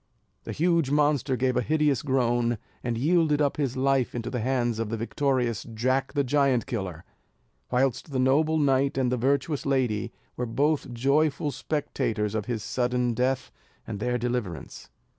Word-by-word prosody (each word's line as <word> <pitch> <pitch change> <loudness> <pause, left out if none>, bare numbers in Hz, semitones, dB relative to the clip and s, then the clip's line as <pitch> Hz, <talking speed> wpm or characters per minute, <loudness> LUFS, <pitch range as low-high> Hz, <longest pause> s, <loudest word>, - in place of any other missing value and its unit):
The - - -4
huge 165 -3 +2
monster 145 -2 +2
gave 130 +1 0
a 125 - +2
hideous 150 +1 +1
groan, 120 -3 +1 0.3
and 120 -2 -1
yielded 155 +2 +2
up 145 -2 +1
his 135 -3 -1
life 135 -2 +1
into 120 0 -4
the 125 - -2
hands 120 -1 0
of 115 -2 -2
the 115 - -2
victorious 120 -1 0
Jack 130 +4 0
the 140 - +2
Giant 135 -2 +2
Killer, 95 - -4 0.7
whilst 130 +3 0
the 135 - -2
noble 150 +5 +3
knight 135 -2 +2
and 130 -2 +1
the 125 - +1
virtuous 140 +4 0
lady 125 -7 0 0.2
were 125 - -3
both 140 +3 0
joyful 140 +4 +1
spectators 115 -6 -2
of 110 -2 -2
his 115 -3 -3
sudden 125 0 0
death 125 +2 -1 0.3
and 100 - -5
their 125 +2 0
deliverance. 120 - -4
130 Hz, 160 wpm, -26 LUFS, 120-140 Hz, 0.7 s, noble